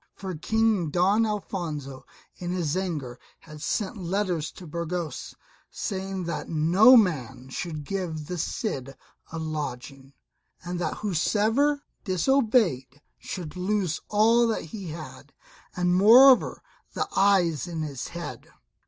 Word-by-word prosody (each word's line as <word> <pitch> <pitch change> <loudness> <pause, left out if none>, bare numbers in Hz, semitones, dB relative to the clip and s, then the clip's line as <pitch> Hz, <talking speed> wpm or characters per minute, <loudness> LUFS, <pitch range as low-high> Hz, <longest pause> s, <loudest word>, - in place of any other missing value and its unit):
For 190 -1 -6
King 215 +1 +1
Don 195 +7 +3
Alfonso 160 -10 -5 0.3
in 175 - -5
his 175 -4 -1
anger 150 -10 -3 0.2
had 155 -2 -12
sent 210 +6 -2
letters 180 -3 -2
to 180 - -11
Burgos, 170 +1 -4 0.3
saying 190 -1 -4
that 170 -2 -4
no 175 +11 +6
man 130 - 0
should 155 +2 -5
give 165 -4 -4
the 180 +2 -5
Cid 135 - -3 0.4
a 165 - -5
lodging; 140 -3 -5 0.5
and 175 0 -4
that 175 - -2
whosoever 220 - +1 0.2
disobeyed 185 - +1 0.2
should 175 -4 -7
lose 185 -2 -1
all 230 +3 +4
that 225 - -1
he 190 +3 -8
had, 155 0 -9 0.4
and 180 0 +1
moreover 245 +7 +6 0.3
the - - -2
eyes 180 -8 +3
in 165 -2 -4
his 140 -4 -5
head. 170 0 -7
180 Hz, 125 wpm, -26 LUFS, 155-205 Hz, 0.5 s, no